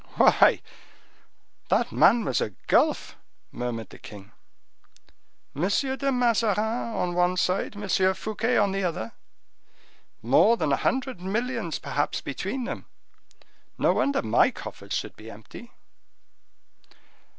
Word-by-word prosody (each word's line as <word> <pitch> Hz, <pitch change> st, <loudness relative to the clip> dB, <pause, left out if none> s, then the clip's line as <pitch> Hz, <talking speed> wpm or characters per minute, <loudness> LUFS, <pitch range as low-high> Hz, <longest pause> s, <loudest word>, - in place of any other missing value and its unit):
"Why, -, -, +5 dB, 1.1 s
that -, -, +1 dB
man 230 Hz, -1 st, +4 dB
was 130 Hz, -, 0 dB
a 105 Hz, -, -3 dB
gulf!" -, -, +1 dB, 0.3 s
murmured 115 Hz, -4 st, -5 dB
the -, -, -13 dB
king. 105 Hz, 0 st, -12 dB, 1.2 s
"M. 160 Hz, +7 st, 0 dB
de 270 Hz, +5 st, 0 dB
Mazarin 230 Hz, -5 st, +2 dB, 0.4 s
on 175 Hz, -1 st, -1 dB
one 180 Hz, +1 st, +1 dB
side, 185 Hz, +3 st, 0 dB
M. 205 Hz, 0 st, -6 dB, 0.3 s
Fouquet 220 Hz, +4 st, -1 dB
on 205 Hz, -1 st, +3 dB
the 195 Hz, 0 st, -2 dB
other,—more 140 Hz, -, -2 dB
than 155 Hz, -7 st, 0 dB
a 140 Hz, -, +3 dB
hundred 260 Hz, -7 st, -1 dB
millions 220 Hz, -1 st, -2 dB
perhaps 145 Hz, +1 st, -2 dB
between 195 Hz, -, -4 dB
them! 270 Hz, +4 st, -6 dB, 0.9 s
No -, -, +3 dB
wonder 280 Hz, 0 st, +1 dB
my 110 Hz, -, +4 dB
coffers -, -, -8 dB
should -, -, -3 dB
be 110 Hz, +1 st, -12 dB
empty!" 115 Hz, -, -12 dB
195 Hz, 115 wpm, -26 LUFS, -, 1.2 s, Why